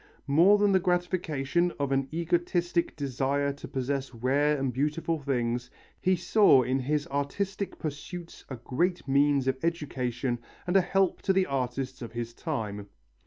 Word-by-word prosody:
More 170 Hz, +9 st, +5 dB
than 205 Hz, -1 st, +3 dB
the 190 Hz, -, +4 dB
gratification 175 Hz, -2 st, 0 dB
of 140 Hz, -1 st, -1 dB
an 135 Hz, 0 st, +1 dB
egotistic 175 Hz, +1 st, 0 dB
desire 140 Hz, 0 st, -1 dB
to 140 Hz, -, -9 dB
possess 135 Hz, -1 st, -3 dB
rare 140 Hz, +5 st, +2 dB
and 135 Hz, -2 st, -1 dB
beautiful 150 Hz, +4 st, -1 dB
things, 125 Hz, -3 st, -1 dB, 0.3 s
he 185 Hz, 0 st, +2 dB
saw 175 Hz, -, +5 dB
in 130 Hz, +2 st, 0 dB
his 145 Hz, +3 st, 0 dB
artistic 190 Hz, +8 st, -2 dB
pursuits 165 Hz, +3 st, -7 dB
a 130 Hz, -, -4 dB
great 155 Hz, +10 st, -1 dB
means 140 Hz, 0 st, +3 dB
of 130 Hz, +1 st, -1 dB
education 130 Hz, -7 st, -2 dB, 0.3 s
and 180 Hz, +1 st, -1 dB
a 195 Hz, -, +7 dB
help 195 Hz, +1 st, +1 dB
to 190 Hz, -, +2 dB
the 190 Hz, 0 st, +3 dB
artists 130 Hz, -1 st, -3 dB
of 115 Hz, -1 st, -7 dB
his 115 Hz, -1 st, -4 dB
time. 105 Hz, -3 st, -4 dB
140 Hz, 155 wpm, -28 LUFS, 130-175 Hz, 0.3 s, a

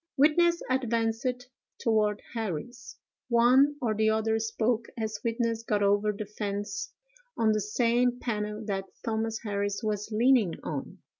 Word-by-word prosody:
Witness 340 Hz, +4 st, +4 dB
advanced 245 Hz, 0 st, -1 dB, 0.3 s
toward 215 Hz, -3 st, +1 dB
Harris. 230 Hz, +3 st, -5 dB, 0.3 s
One 255 Hz, +5 st, +5 dB
or 230 Hz, -4 st, 0 dB
the 220 Hz, +1 st, +2 dB
other 220 Hz, 0 st, +1 dB
spoke 225 Hz, +1 st, 0 dB
as 220 Hz, -2 st, -3 dB
witness 230 Hz, -1 st, 0 dB
got 210 Hz, -3 st, 0 dB
over 205 Hz, +1 st, +3 dB
the 210 Hz, +1 st, -5 dB
fence 205 Hz, -, -4 dB, 0.5 s
on 220 Hz, -1 st, +3 dB
the 215 Hz, 0 st, +1 dB
same 240 Hz, +4 st, +1 dB
panel 210 Hz, -2 st, -3 dB
that 195 Hz, -2 st, -2 dB, 0.2 s
Thomas 225 Hz, -1 st, -1 dB
Harris 205 Hz, -1 st, -2 dB
was 210 Hz, -1 st, -2 dB
leaning 225 Hz, -4 st, +4 dB
on. 145 Hz, -3 st, -5 dB
225 Hz, 135 wpm, -28 LUFS, 210-240 Hz, 0.5 s, One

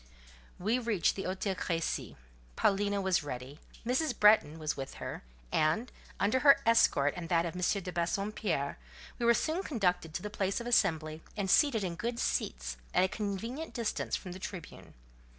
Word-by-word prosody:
We 220 Hz, +7 st, +1 dB
reached 225 Hz, -7 st, +1 dB
the 195 Hz, -, -4 dB
Hôtel 190 Hz, +1 st, -2 dB
Crécy; 165 Hz, -3 st, -2 dB, 0.4 s
Paulina 200 Hz, 0 st, +2 dB
was 190 Hz, -3 st, +2 dB
ready; 135 Hz, +1 st, -7 dB, 0.3 s
Mrs. 255 Hz, +3 st, 0 dB
Bretton 210 Hz, -7 st, +5 dB
was 155 Hz, -2 st, -2 dB
with 135 Hz, -1 st, -6 dB
her; -, -, -6 dB, 0.3 s
and, 160 Hz, +11 st, +1 dB, 0.3 s
under 210 Hz, +6 st, +2 dB
her 280 Hz, 0 st, +7 dB
escort 145 Hz, -11 st, +4 dB
and 170 Hz, -2 st, -6 dB
that 170 Hz, -1 st, +3 dB
of 170 Hz, -, -4 dB
M. 180 Hz, -, -4 dB
de 185 Hz, 0 st, 0 dB
Bassompierre, 175 Hz, -3 st, -1 dB, 0.4 s
we 235 Hz, -, +1 dB
were 235 Hz, -, +6 dB
soon 325 Hz, +8 st, 0 dB
conducted 180 Hz, -, -1 dB
to -, -, -3 dB
the 210 Hz, -, -5 dB
place 195 Hz, 0 st, -1 dB
of 235 Hz, -, -6 dB
assembly, 160 Hz, -9 st, +1 dB, 0.2 s
and 195 Hz, -2 st, 0 dB
seated 275 Hz, -9 st, +4 dB
in 180 Hz, -2 st, -2 dB
good 235 Hz, +7 st, -3 dB
seats, -, -, -2 dB, 0.2 s
at -, -, +5 dB
a -, -, +4 dB
convenient 225 Hz, +10 st, -4 dB
distance 230 Hz, -3 st, -1 dB
from 185 Hz, -, -6 dB
the 185 Hz, -, -7 dB
Tribune. 185 Hz, -2 st, -8 dB
195 Hz, 170 wpm, -31 LUFS, 165-230 Hz, 0.4 s, her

